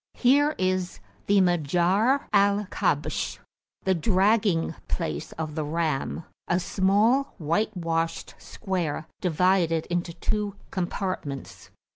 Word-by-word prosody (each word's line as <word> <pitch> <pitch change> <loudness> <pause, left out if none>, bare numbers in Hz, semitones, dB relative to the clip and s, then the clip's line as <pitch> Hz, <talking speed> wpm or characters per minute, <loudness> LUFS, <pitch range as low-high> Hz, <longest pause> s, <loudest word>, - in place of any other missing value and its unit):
Here 290 +4 +3
is 185 -1 -1 0.3
the 200 -1 +5
Majarr 180 - +2
al 200 0 +3
Kabsh, - - -1 0.5
the 190 - +2
Dragging 190 0 +2
place 75 -1 -3
of 155 -1 -5
the 155 0 -2
Ram, 155 0 -2 0.2
a 175 - +2
small, 205 +9 +2
whitewashed 165 -2 -1
square, 175 -7 -3
divided 175 -1 +2
[p.220] - - -15
into 175 -1 -1
two 205 +3 -2 0.2
compartments. 180 -6 -4
185 Hz, 105 wpm, -26 LUFS, 165-205 Hz, 0.5 s, the